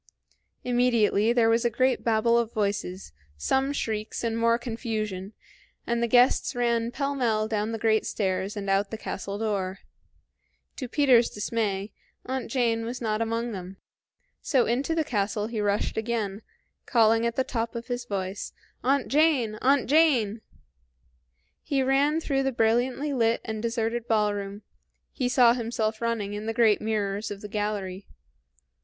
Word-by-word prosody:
Immediately 235 Hz, -3 st, +2 dB
there 235 Hz, -2 st, +3 dB
was 230 Hz, +1 st, +3 dB
a 240 Hz, -, +3 dB
great 255 Hz, +3 st, +1 dB
babble 230 Hz, +1 st, +2 dB
of 235 Hz, -1 st, +1 dB
voices, 200 Hz, -, -3 dB, 0.2 s
some 265 Hz, -, +1 dB
shrieks, 220 Hz, -6 st, -3 dB
and 230 Hz, -1 st, -1 dB
more 230 Hz, 0 st, +3 dB
confusion, 220 Hz, -5 st, -4 dB, 0.5 s
and 235 Hz, 0 st, -1 dB
the 235 Hz, -, +2 dB
guests 245 Hz, +2 st, +3 dB
ran 235 Hz, -1 st, +1 dB
pell 280 Hz, +3 st, -2 dB
mell 225 Hz, -5 st, 0 dB
down 215 Hz, 0 st, -1 dB
the 225 Hz, -, -3 dB
great 220 Hz, 0 st, +1 dB
stairs 190 Hz, 0 st, -2 dB
and 200 Hz, -1 st, -4 dB
out 195 Hz, +1 st, +1 dB
the 220 Hz, -, -5 dB
castle 200 Hz, -1 st, -5 dB
door. 200 Hz, -3 st, -2 dB, 1.0 s
To 255 Hz, -, -4 dB
Peter's 250 Hz, -3 st, +4 dB
dismay, 205 Hz, -2 st, -2 dB, 0.3 s
Aunt 260 Hz, 0 st, -3 dB
Jane 230 Hz, -2 st, +1 dB
was 240 Hz, +2 st, -5 dB
not 220 Hz, -2 st, -1 dB
among 230 Hz, +1 st, -1 dB
them. 190 Hz, -1 st, -7 dB, 0.6 s
So 260 Hz, -5 st, +2 dB
into 270 Hz, +7 st, 0 dB
the 320 Hz, -, +2 dB
castle 210 Hz, -4 st, -1 dB
he 220 Hz, -1 st, -3 dB
rushed 205 Hz, 0 st, 0 dB
again, 220 Hz, -3 st, -2 dB, 0.5 s
calling 225 Hz, -1 st, +4 dB
at 235 Hz, -, -3 dB
the 260 Hz, -, +2 dB
top 230 Hz, -2 st, -3 dB
of 235 Hz, 0 st, -5 dB
his 245 Hz, -1 st, -4 dB
voice, 195 Hz, -2 st, -4 dB, 0.3 s
"Aunt 270 Hz, +2 st, +2 dB
Jane! 270 Hz, -8 st, +2 dB
Aunt 275 Hz, +1 st, +3 dB
Jane!" 250 Hz, -8 st, +3 dB, 1.2 s
He 275 Hz, -2 st, 0 dB
ran 280 Hz, +4 st, +2 dB
through 275 Hz, -4 st, 0 dB
the 270 Hz, 0 st, 0 dB
brilliantly 245 Hz, +5 st, +1 dB
lit 230 Hz, -2 st, +2 dB
and 220 Hz, -1 st, -4 dB
deserted 230 Hz, 0 st, -2 dB
ballroom; 205 Hz, -2 st, -1 dB, 0.5 s
he 250 Hz, -3 st, -1 dB
saw 245 Hz, -2 st, +5 dB
himself 225 Hz, -2 st, -2 dB
running 225 Hz, -3 st, -1 dB
in 210 Hz, +1 st, -5 dB
the 225 Hz, -, -2 dB
great 225 Hz, -3 st, +4 dB
mirrors 210 Hz, -1 st, -2 dB
of 205 Hz, -1 st, -7 dB
the 210 Hz, -, -6 dB
gallery. 205 Hz, -2 st, -3 dB
225 Hz, 155 wpm, -26 LUFS, 210-245 Hz, 1.2 s, saw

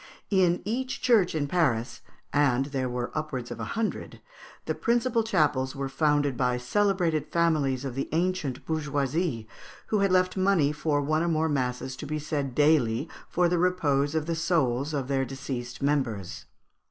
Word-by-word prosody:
In 180 Hz, -3 st, +3 dB
each 255 Hz, +5 st, -2 dB
church 215 Hz, -9 st, +4 dB
in 150 Hz, -2 st, 0 dB
Paris, 135 Hz, -7 st, 0 dB, 0.3 s
and 135 Hz, -3 st, +3 dB
there 130 Hz, -2 st, -1 dB
were 120 Hz, 0 st, -3 dB
upwards 135 Hz, -6 st, -4 dB
of 120 Hz, -, -6 dB
a -, -, -3 dB
hundred, 225 Hz, -1 st, -3 dB, 0.5 s
the -, -, -1 dB
principal 235 Hz, 0 st, +1 dB
chapels 145 Hz, -9 st, +1 dB
were 135 Hz, 0 st, -3 dB
founded 145 Hz, -1 st, +1 dB
by 125 Hz, 0 st, +1 dB
celebrated 165 Hz, +2 st, +1 dB
families 150 Hz, -6 st, +1 dB
of 135 Hz, -, -4 dB
the 135 Hz, +2 st, -3 dB
ancient 160 Hz, -5 st, -1 dB
bourgeoisie, 145 Hz, -4 st, -1 dB, 0.4 s
who 215 Hz, -, +2 dB
had 195 Hz, -1 st, +2 dB
left 185 Hz, 0 st, +3 dB
money 185 Hz, -6 st, +3 dB
for 150 Hz, -1 st, 0 dB
one 155 Hz, +2 st, +1 dB
or 170 Hz, -, 0 dB
more 160 Hz, -1 st, +1 dB
masses 130 Hz, -2 st, -2 dB
to 145 Hz, -, -7 dB
be 155 Hz, +1 st, -2 dB
said 145 Hz, -4 st, -3 dB
daily 145 Hz, -3 st, +3 dB, 0.2 s
for 175 Hz, 0 st, +2 dB
the 175 Hz, 0 st, +1 dB
repose 150 Hz, -5 st, +1 dB
of 155 Hz, -1 st, 0 dB
the 165 Hz, -, -1 dB
soûls 155 Hz, -5 st, 0 dB
of 140 Hz, -4 st, -2 dB
their 135 Hz, -1 st, +1 dB
deceased 130 Hz, -2 st, -6 dB
members. 125 Hz, -10 st, -1 dB
150 Hz, 165 wpm, -27 LUFS, 130-170 Hz, 0.5 s, church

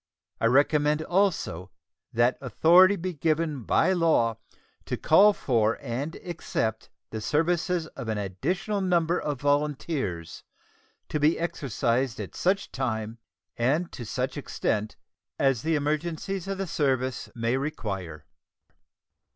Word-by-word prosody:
I 115 Hz, -, +3 dB
recommend 150 Hz, +4 st, +3 dB
also 165 Hz, -, 0 dB, 0.4 s
that 120 Hz, +2 st, +3 dB
authority 175 Hz, -, +5 dB
be 185 Hz, 0 st, -4 dB
given 155 Hz, -2 st, 0 dB
by 185 Hz, +3 st, +3 dB
law 155 Hz, -11 st, +2 dB, 0.5 s
to -, -, -3 dB
call 200 Hz, +7 st, +6 dB
for 115 Hz, -, +1 dB
and 140 Hz, +5 st, -4 dB
accept 115 Hz, -10 st, -3 dB, 0.2 s
the 110 Hz, -, -4 dB
services 165 Hz, -, +1 dB
of 120 Hz, -, -9 dB
an 110 Hz, -1 st, -1 dB
additional 165 Hz, -, -2 dB
number 175 Hz, -2 st, +2 dB
of 145 Hz, -3 st, -3 dB
volunteers, 145 Hz, -, -1 dB, 0.7 s
to 150 Hz, -, -1 dB
be 150 Hz, +3 st, +3 dB
exercised 130 Hz, -5 st, -1 dB
at -, -, -6 dB
such 195 Hz, +2 st, 0 dB
time 115 Hz, -3 st, -3 dB, 0.4 s
and 150 Hz, +9 st, 0 dB
to 120 Hz, -, -7 dB
such 105 Hz, -4 st, -3 dB
extent 105 Hz, 0 st, -2 dB, 0.4 s
as 135 Hz, -5 st, +2 dB
the 160 Hz, 0 st, +1 dB
emergencies 160 Hz, +5 st, -2 dB
of 195 Hz, 0 st, -3 dB
the 195 Hz, -, -2 dB
service 130 Hz, -6 st, -1 dB
may 115 Hz, +1 st, 0 dB
require. 95 Hz, -, -4 dB
145 Hz, 125 wpm, -27 LUFS, 115-170 Hz, 0.7 s, call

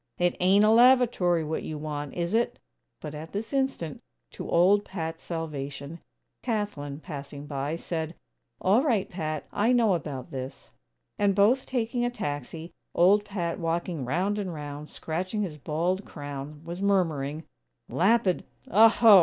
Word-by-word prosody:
It 175 Hz, 0 st, +2 dB
ain't 195 Hz, +3 st, +5 dB
a 215 Hz, -, +5 dB
lavatory 235 Hz, -8 st, +5 dB
what 155 Hz, +1 st, -2 dB
you 155 Hz, -, -5 dB
want, 150 Hz, -2 st, -5 dB
is 175 Hz, +2 st, -2 dB
it?" 235 Hz, +1 st, +1 dB, 0.4 s
But 150 Hz, -1 st, -6 dB
at 155 Hz, +2 st, -8 dB
this 220 Hz, +5 st, -4 dB
instant, 265 Hz, -, -1 dB, 0.3 s
to -, -, -7 dB
old 195 Hz, +4 st, +5 dB
Pat's 165 Hz, -4 st, -5 dB
salvation, 150 Hz, -2 st, -5 dB, 0.4 s
Kathlyn, 160 Hz, -, -3 dB
passing 145 Hz, -3 st, -7 dB
by, 145 Hz, +1 st, -2 dB
said: 165 Hz, -1 st, -4 dB, 0.4 s
"All 200 Hz, +6 st, +4 dB
right, 230 Hz, -10 st, +2 dB
Pat. 155 Hz, -4 st, -4 dB
I 225 Hz, +5 st, +3 dB
know 230 Hz, -5 st, +4 dB
about 140 Hz, -6 st, -4 dB
this;" 130 Hz, 0 st, -7 dB, 0.5 s
and, 200 Hz, -1 st, +3 dB
both 220 Hz, +7 st, +4 dB
taking 240 Hz, -1 st, -1 dB
a 245 Hz, -, +2 dB
taxi, 160 Hz, -, -5 dB, 0.2 s
old 200 Hz, +4 st, +5 dB
Pat 180 Hz, -5 st, -3 dB
walking 165 Hz, -2 st, -1 dB
round 185 Hz, +11 st, 0 dB
and 190 Hz, -3 st, -3 dB
round, 150 Hz, -1 st, -7 dB
scratching 185 Hz, +6 st, -3 dB
his 155 Hz, -6 st, -5 dB
bald 170 Hz, +7 st, -1 dB
crown, 145 Hz, -1 st, -7 dB
was 170 Hz, +3 st, -6 dB
murmuring: 160 Hz, -7 st, +1 dB, 0.4 s
"Lapid 195 Hz, 0 st, +3 dB, 0.3 s
Aho! 220 Hz, 0 st, +8 dB
170 Hz, 145 wpm, -27 LUFS, 150-205 Hz, 0.5 s, Aho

